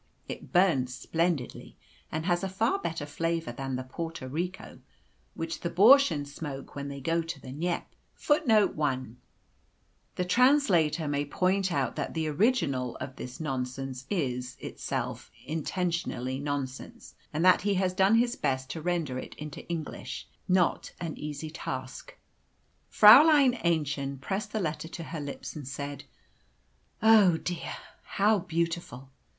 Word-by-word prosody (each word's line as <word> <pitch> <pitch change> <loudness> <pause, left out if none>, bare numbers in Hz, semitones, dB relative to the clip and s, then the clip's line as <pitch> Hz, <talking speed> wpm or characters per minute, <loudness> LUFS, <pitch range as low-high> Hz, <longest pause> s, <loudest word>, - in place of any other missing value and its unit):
It - - -8
burns 150 -10 +3
splendidly, 165 -6 -2 0.3
and 155 +1 -3
has 175 0 +1
a 195 - -1
far 225 - +1
better 165 - -3
flavour 165 0 -2
than 135 +2 -4
the 130 - -3
Porto 165 +1 -6
Rico 180 +8 -5 0.6
which 165 0 -4
the 170 - -3
Bürschen 200 - +6
smoke 140 -1 -7
when 140 0 -5
they 140 0 -6
go 165 +5 0
to 165 -3 -6
the 130 - -9
Kneipe." 170 +4 -2 0.3
[Footnote 225 -8 +3
1: 130 -5 -2 1.0
The 180 - -1
translator 180 - +3
may 145 0 0
point 185 +5 +1
out 140 -4 0
that - - -3
the 160 -1 -1
original 145 - +1
of 130 - -7
this 125 - -7
nonsense 130 -2 -4
is, 130 -9 -2
itself, - - -4 0.2
intentionally 160 -6 -2
nonsense, 140 -2 -5 0.2
and 160 +4 0
that 185 - +6
he 200 +1 +1
has 185 -1 +1
done 190 +3 +4
his 240 +1 +2
best 130 0 -1
to 160 - -5
render 165 -7 -1
it - - -9
into 150 -1 -8
English 165 -3 -5 0.2
not 180 -2 +1
an 165 -2 -4
easy 150 +1 -6
task. 170 - -6
A. - - -15
E.] - - -36 0.8
Fräulein 270 +3 +8
Aennchen 140 -5 0
pressed 195 +9 -3
the 220 - -1
letter 160 -3 -3
to 165 +1 -7
her 160 0 -6
lips, 145 -1 -6
and 145 -4 -7
said, 140 +1 -6 1.0
"Oh, 215 -5 +7
how - - 0
dear, 175 +1 -4 0.3
how 210 +1 +2
beautiful! 165 -6 -3
165 Hz, 150 wpm, -29 LUFS, 140-185 Hz, 1.0 s, Fräulein